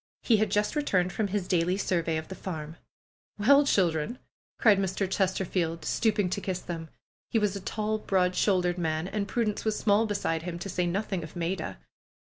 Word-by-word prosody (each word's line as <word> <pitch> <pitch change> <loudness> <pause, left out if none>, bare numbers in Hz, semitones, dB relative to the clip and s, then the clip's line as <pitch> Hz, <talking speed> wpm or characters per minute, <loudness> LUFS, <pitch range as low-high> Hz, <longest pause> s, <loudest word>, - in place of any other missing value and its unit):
He 225 - +4
had 215 0 +1
just 210 +5 +1
returned 185 -12 +1
from 215 - 0
his 195 -2 -2
daily 180 +1 +2
survey 170 -4 0
of 160 - -5
the - - -7
farm. 160 -4 -6 0.6
^^Well, 280 +7 +6
children 170 +4 +1 0.2
!" - - -80
cried 210 -5 +5
Mr. 190 0 0
Chesterfield, 180 -4 -1
stooping 210 -4 +1
to - - -2
kiss 185 -2 -2
them. 165 -3 -6 0.4
He - - +1
was 210 -2 +1
a 200 - -5
tall, 215 +2 -2
broad 185 -3 +1
shouldered 180 -3 +2
man, 160 0 -1
and 200 +1 -2
Prudence 215 -1 -1
was 215 -1 0
small 210 +1 +3
beside 200 -6 -1
him, 170 0 -5
to 185 +3 -6
say 180 -1 0
nothing 195 0 -1
of 160 -1 -9
Maida. 175 - -3
190 Hz, 190 wpm, -28 LUFS, 175-210 Hz, 0.6 s, ^^Well